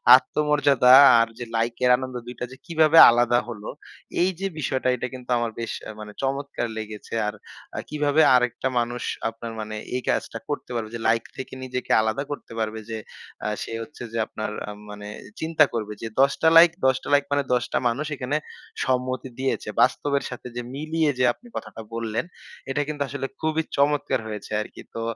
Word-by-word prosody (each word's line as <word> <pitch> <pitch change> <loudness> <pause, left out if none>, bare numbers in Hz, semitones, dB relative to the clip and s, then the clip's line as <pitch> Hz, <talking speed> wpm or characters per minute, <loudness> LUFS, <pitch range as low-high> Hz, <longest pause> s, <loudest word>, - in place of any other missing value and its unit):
আত্মমর্যাদা 145 -2 +4 0.3
আর 115 - +3
যে 120 - -4
লাইকের 120 +2 +1
আনন্দ 130 -1 -6
২ 125 +1 -8
টা 125 - -2
যে 130 - -11
কিভাবে 160 -1 +4
আলাদা 120 0 +3
হলো?" 105 -2 -7 0.5
এইযে 190 +1 0
বিষয়টা 130 -2 -1
এটা 125 - -3
কিন্তু 125 -1 -10
আমার 120 -1 -1
বেশ 115 -2 -3 0.2
আ - - -4
মানে 105 -1 -8
চমৎকার 135 -2 -2
লেগেছে। 110 -1 -7
আর 105 - -2 0.4
আ - - -1
কিভাবে 150 +1 +2
আরেকটা 125 +1 +1
মানুষ 120 +1 -2 0.3
আপনার 115 0 -8
মানে 110 0 -5 0.2
এই 125 - -1
কাজটা - - -1
করতে 145 - -4
পারবে 110 -2 -3
যে, - - -4
লাইক 115 0 +3
থেকে 130 - -7
নিজেকে 125 -1 -4
আলাদা 110 +5 -1
করতে 145 - -7
পারবে? 110 0 -2
যে 110 - -3 0.5
আ - - +1 0.2
সে - - -8
হচ্ছে 150 - -14
যে - - -2
আপনার 110 0 -4 0.2
আম 105 - -8
মানে 105 0 -8
এ - - -12 0.2
চিন্তা 160 -1 +4
করবে 105 -2 -3
যে, - - -4 0.2
১০ 135 0 +4
টা 160 - +6
লাইক 165 0 +9
১০ 130 -1 +5
টা - - -8
লাইক 145 0 +4
মানে 145 0 +2
১০ 125 -1 +2
টা - - +3
মানুষ 135 +6 -2
এখানে 130 +3 -1 0.5
সম্মতি 130 0 -1
দিয়েছে। 130 -4 -1
বাস্তবের 140 +2 +2
সাথে 125 0 -8
যে 120 - -2
মিলিয়ে 155 +1 0
যে 125 - +3
আপনি 240 - -19
কথাটা - - -7
বললেন, 115 +3 -2 0.4
এটা 140 +2 0
কিন্তু 150 -1 -5
আসলে 140 -1 -3
খুবই 160 0 0
চমৎকার 140 -2 +2
হয়েছে 105 -1 -7
আরকি। - - -9
তো 115 - -3
130 Hz, 190 wpm, -24 LUFS, 115-145 Hz, 0.5 s, লাইক